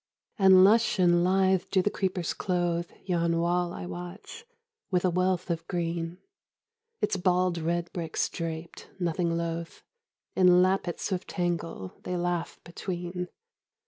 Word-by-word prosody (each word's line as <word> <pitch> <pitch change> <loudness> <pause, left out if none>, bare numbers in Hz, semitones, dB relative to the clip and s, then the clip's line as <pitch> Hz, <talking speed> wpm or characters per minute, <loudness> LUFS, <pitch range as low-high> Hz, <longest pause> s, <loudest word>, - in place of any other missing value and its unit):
And 190 -1 +8
lush 220 +3 +4
and 175 -2 +4
lithe 190 0 +3
do 190 -2 +2
the 205 - +1
creepers 185 -3 -1
clothe 175 -2 -1 0.2
Yon 170 -2 +1
wall 175 +1 +1
I 175 - -6
watch, 180 - -8 0.4
with 180 -1 +1
a 180 - +3
wealth 180 0 0
of 165 -1 -3
green: 170 -1 -2 0.8
Its - - +1
bald 180 -1 +2
red 170 +1 -2
bricks 170 -3 -1
draped, 165 0 -6
nothing 170 -1 0
loath, 170 0 -4 0.5
In 180 -1 +6
lappets 185 -1 0
of 185 -1 -2
tangle 170 - -3
they 180 - -3
laugh 175 -1 -2
between. 180 0 -5
175 Hz, 135 wpm, -28 LUFS, 170-185 Hz, 0.8 s, And